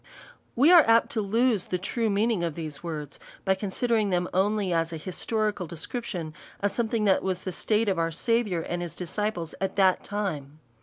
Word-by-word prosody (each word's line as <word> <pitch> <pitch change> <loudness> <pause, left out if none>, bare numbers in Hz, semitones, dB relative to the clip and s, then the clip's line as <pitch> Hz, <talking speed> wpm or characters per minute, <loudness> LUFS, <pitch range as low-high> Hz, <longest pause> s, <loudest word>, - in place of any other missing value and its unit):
We 280 +8 +6
are 350 -2 +10
apt 230 0 +4
to 220 - 0
lose 220 0 +1
the 180 - -2
true 225 +5 -1
meaning; 210 -1 +1
of 165 -3 -2
these 155 -3 -6
words, 150 -4 -6 0.3
by 190 - +4
considering 210 +2 0
them 180 -1 0
only 200 0 +1
as 165 0 +1
an 165 - -4
historical 205 +3 -2
de 170 - -8
scription 175 -4 -5 0.3
of 205 0 +1
something 225 -1 0
that 195 -2 +4
was 185 -1 -2
the 185 - -3
state 215 +5 0
of 190 -4 +1
our 165 0 +1
Sa 230 +8 +1
viour 180 -8 -3
and 175 0 -2
his 170 -2 -5
disciples 180 -2 -3
at 195 - -1
that 190 -2 +3
time. 155 -9 -4
190 Hz, 200 wpm, -27 LUFS, 170-220 Hz, 0.3 s, are